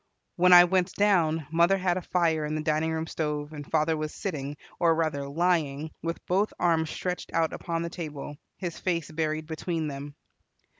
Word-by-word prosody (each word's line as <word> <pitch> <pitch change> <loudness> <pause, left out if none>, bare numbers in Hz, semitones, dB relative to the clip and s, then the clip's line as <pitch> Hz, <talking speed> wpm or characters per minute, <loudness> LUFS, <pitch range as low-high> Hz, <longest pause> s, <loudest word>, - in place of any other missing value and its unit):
When 180 +1 +4
I 175 0 +11
went 180 +1 +1
down, 165 -7 +2
mother 170 +4 +4
had 180 -2 +1
a 185 - -2
fire 165 -3 +1
in 150 +1 -2
the 155 - -2
dining 155 +1 +1
room 160 0 -2
stove, 150 -2 -3
and 145 -2 -8
father 160 0 +2
was 155 0 -3
sitting, 145 -6 -4 0.2
or 165 -1 +4
rather 155 -4 -1
lying, 155 -2 0
with 165 0 -4
both 195 +4 +1
arms 165 -2 +2
stretched 180 +1 -4
out 165 -1 +2
upon 170 -1 -3
the 170 - -3
table, 150 -4 -6 0.2
his 175 -3 -5
face 170 -4 -1
buried 155 0 -1
between 160 0 -3
them. 140 +1 -7
160 Hz, 185 wpm, -27 LUFS, 155-175 Hz, 0.2 s, I